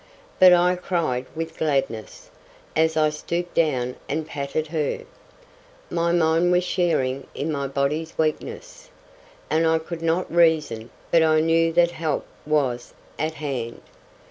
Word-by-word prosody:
But 185 -1 +9
I 180 +1 +4
cried 160 -9 -1
with 165 0 -5
gladness, 135 -8 -2 0.4
as 160 0 +2
I 155 -1 +3
stooped 170 +3 -4
down 125 -6 0
and 155 +2 -1
patted 150 0 -3
her. 160 - -1 0.9
My 170 0 +1
mind 170 +1 +3
was 180 0 +3
sharing 135 -8 0
in 155 +3 -2
my 140 -2 -2
body's 140 +4 -2
weakness, - - -3 0.6
and 160 +1 +2
I 160 0 +3
could 165 +1 -6
not 165 +1 0
reason, 155 -9 +2 0.2
but 165 - +5
I 155 -1 +4
knew 165 +1 +3
that 170 0 +4
help 160 -3 -2 0.2
was 135 -6 0 0.2
at 155 +1 -1
hand. 130 -6 -4
160 Hz, 140 wpm, -23 LUFS, 140-170 Hz, 0.9 s, But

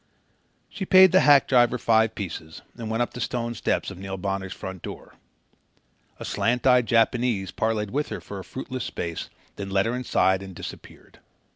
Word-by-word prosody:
She 205 - -6
paid 185 -1 +7
the 185 - +6
hack 145 -5 +6
driver 120 -1 +4
five 110 -2 +2
pieces 80 -5 -7
and 115 -2 -6
went 115 +2 +1
up - - -6
the 125 - -6
stone 120 0 -2
steps 115 - -1
of 90 - -10
Neil 95 0 -5
Bonner's 95 0 -3
front 95 -2 -7
door. - - -9 1.1
A - - -6
slant 125 +1 0
eyed 125 -2 +5
Japanese 115 -4 +1
parleyed 110 -2 -1
with 145 +3 -1
her - - -5
for 100 - -8
a - - -7
fruitless 130 +1 -6
space, 85 -1 -5 0.3
then 100 -1 -5
led 95 0 +2
her 115 +2 -1
inside 95 -6 +1
and 95 -2 -9
disappeared. - - -11
115 Hz, 180 wpm, -25 LUFS, 95-125 Hz, 1.1 s, paid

